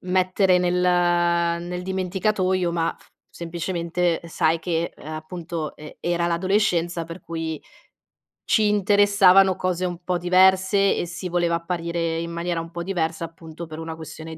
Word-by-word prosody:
mettere 185 +1 +2
nel 180 0 +1
nel 175 0 +1
dimenticatoio, 185 -1 0
ma 165 -1 0
f - - -23 0.2
semplicemente 170 0 -2
sai 165 0 +1
che, 165 0 -2
uhm, - - -14
appunto, 160 0 -6
e 150 0 -12
era 170 0 0
l'adolescenza 175 -1 +1
per 165 +2 -9
cui 160 -2 -5 0.8
ci 215 -2 +3
interessavano 200 -2 +5
cose 185 -1 -1
un 175 0 -4
po' 180 0 0
diverse 190 +2 +4
e - - -2
si 180 +2 -6
voleva 170 -1 +1
apparire 170 -1 -2
in 170 0 -4
maniera 170 0 -2
un 165 +1 -9
po' 170 0 -5
diversa, 165 -3 -2
appunto, 165 0 -10
per 155 0 -9
una 160 0 -5
questione 160 0 -9
175 Hz, 145 wpm, -23 LUFS, 165-185 Hz, 0.8 s, interessavano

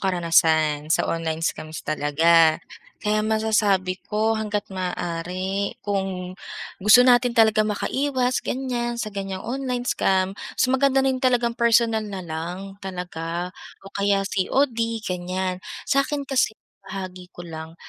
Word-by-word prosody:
karanasan 160 -4 +2
sa - - +2
online 165 -1 -2
scams 155 -1 -4
talaga, 155 +2 +4 0.5
kaya 210 0 +2
masasabi 215 -4 +1
ko 215 +1 +1
hangga't 210 -1 -2
maaari 185 +2 -3
kung 190 -3 -2 0.5
gusto 215 +6 +7
natin 245 -1 +4
talaga 220 -1 +5
makaiwas 255 +3 0
ganiyan, 240 -2 -2
sa 215 -3 -4
ganyang 195 -1 -5
online 250 0 -2
scam, 190 -4 +1
mas 255 - -2
maganda 270 0 +3
rin 260 -1 +1
talagang 245 -2 +2
personal 230 -1 +3
na 200 -3 -6
lang, 175 +5 -6
talaga 180 -2 -5 0.3
o 195 - -12
kaya 200 0 +1
COD 230 +2 0
ganiyan. 185 0 -3 0.2
Sa'kin 280 +1 +1
kasi, 260 -5 +1 0.3
maibahagi 185 -2 -7
ko 175 - -8
lang 160 -1 -8
195 Hz, 125 wpm, -23 LUFS, 180-235 Hz, 0.5 s, gusto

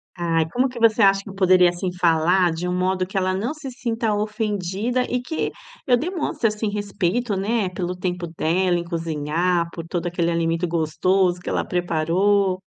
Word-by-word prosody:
Ai, 165 -2 0
como 255 +8 +1
que 250 -1 -8
você 230 -1 +4
acha 195 -1 +5
que 200 - -9
eu - - -10
poderia 185 -2 +5
assim, 175 +1 -3
falar 175 +1 +3
de 170 +2 -3
um 180 - -1
modo 185 0 0
que 195 - -8
ela 185 0 +1
não 215 +10 -2
se 290 -4 -7
sinta 230 -3 -2
ofendida 210 +2 -1
e 250 0 -1
que 315 +6 -2 0.4
eu 250 -3 +5
demonstre, 320 -3 -1
assim, 210 +1 -2
respeito, 205 +2 -1
né, 200 0 0
pelo 180 0 -4
tempo 180 -1 -3
dela 175 +2 0
em 170 - -4
cozinhar, 170 +1 -1
por 165 -1 -7
todo 175 0 -2
aquele 170 -1 0
alimento 165 +1 0
gostoso 175 +3 +1
que - - -8
ela - - 0
preparou 185 +3 +1
185 Hz, 185 wpm, -22 LUFS, 175-210 Hz, 0.4 s, acha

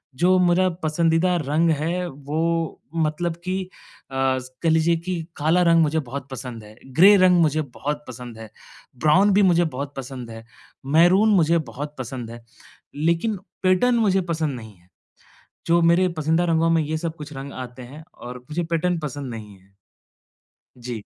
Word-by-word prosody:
जो 180 +6 +3
मेरा 180 +1 +3 0.2
पसंदीदा 165 +3 +2
रंग 155 +4 +2
है 170 +4 -1
वो 160 +2 -2 0.2
मतलब 165 +1 -1
कि 185 +1 -2 0.5
अ, - - -7 0.5
कह 165 - +2
लीजिए 160 +1 +3
कि 185 - -2 0.2
काला 160 +5 +2
रंग 165 -1 +5
मुझे 160 0 +1
बहुत 140 -1 -6
पसंद 125 -4 -7
है। 105 0 -14 0.2
ग्रे 195 +6 +8
रंग 180 -2 +5
मुझे 155 -1 +2 0.2
बहुत 150 +1 -3
पसंद 125 -2 -9
है। 110 -1 -9 0.5
ब्राउन 185 +8 +4
भी 205 - +4
मुझे 175 -2 +4
बहुत 140 +2 -5
पसंद 130 -2 -7
है। 115 0 -9 0.5
मैरून 185 +6 +5
मुझे 170 -2 +3
बहुत 145 +4 -6
पसंद 125 -2 -6
है, 120 0 -11 0.5
लेकिन 170 +8 0 0.3
पैटर्न 185 +7 +3
मुझे 200 -5 +2
पसंद 155 -4 -1
नहीं 110 -2 -12
है। 90 +1 -27 0.8
जो 170 +1 +4
मेरे 170 +2 +4
पसंदीदा 160 +3 +1
रंगों 165 +1 +2
में 165 -1 +3
ये 155 +1 -2
सब 165 0 -4
कुछ 150 -1 -9
रंग 135 0 -7
आते 125 0 -8
हैं 140 +6 -11
और 125 +1 -9
मुझे 165 +3 -2
पैटर्न 170 +1 0
पसंद 145 -3 -5
नहीं 105 -3 -9
है। 95 +1 -27 1.0
जी। 120 -3 -6
160 Hz, 165 wpm, -23 LUFS, 135-175 Hz, 1.0 s, ग्रे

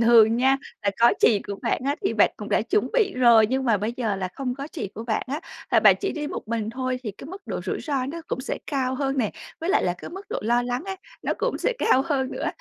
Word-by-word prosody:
thường 230 -1 +6
nha, 265 +2 +4 0.3
là 200 - +2
có 235 +1 +7
chị 210 -4 +5
của 200 - -4
bạn - - 0
á 285 +2 0
thì - - +1
bạn - - +5
cũng - - -7
đã - - +2
chuẩn 420 - +1
bị 435 -6 +2
rồi, 235 -3 +6
nhưng 265 +3 -1
mà 230 -4 +3
bây 210 +3 -2
giờ 220 -5 -1
là 185 -1 -3
không 255 -2 -3
có 275 +2 -6
chị 275 - -4
của 225 - -6
bạn 225 -2 0
á, 285 +4 -3 0.3
là - - +5
bạn - - +7
chỉ 395 - -1
đi 300 -1 -4
một 255 - -6
mình 225 -1 -2
thôi, 255 +1 -2
thì 215 - -3
cái 270 - -11
mức 390 +2 -10
độ - - -3
rủi - - -2
ro 275 -4 -1
nó 335 +4 -5
cũng 255 - -3
sẽ 265 - -4
cao 260 -3 -1
hơn 270 0 -1
nè, 220 -5 +1 0.3
với 335 +3 -1
lại 400 - +3
là 175 - +1
cái - - -8
mức 385 +3 -9
độ - - -2
lo 240 +3 +2
lắng 245 +6 -3
ấy, 385 -1 -4 0.3
nó - - 0
cũng - - -1
sẽ - - +1
cao 265 - +4
hơn 270 -4 0
nữa. - - -3
255 Hz, 285 wpm, -25 LUFS, 230-290 Hz, 0.3 s, có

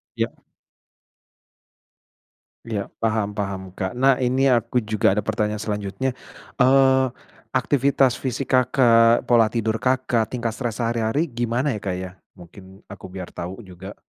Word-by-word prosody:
Ya. - - -1 2.3
Ya 105 -4 -4
paham 110 -2 0
paham 95 -3 -4
Kak 95 -1 -3
nah 135 0 +4
ini 130 +2 +2
aku 125 0 +2
juga 110 -2 +1
ada 105 - 0
pertanyaan 105 -1 -1
selanjutnya, 105 +5 -3 0.4
eee, 130 0 +5 0.5
aktivitas 135 -2 +2
fisik 135 +1 -4
Kakak, 120 -2 +4
pola 115 -2 +5
tidur 115 -1 -1
Kakak, 130 -3 0
tingkat 120 -2 -2
stres 120 -3 -4
sehari-hari 115 +7 0
gimana 120 +1 -1
ya - - -5
Kak 95 -2 -2
ya? 95 -1 -6 0.2
Mungkin 95 +2 -15
aku 100 - -10
biar 90 -2 -7
tau 90 +3 -6
juga. 95 +2 -10
115 Hz, 130 wpm, -22 LUFS, 100-130 Hz, 2.3 s, eee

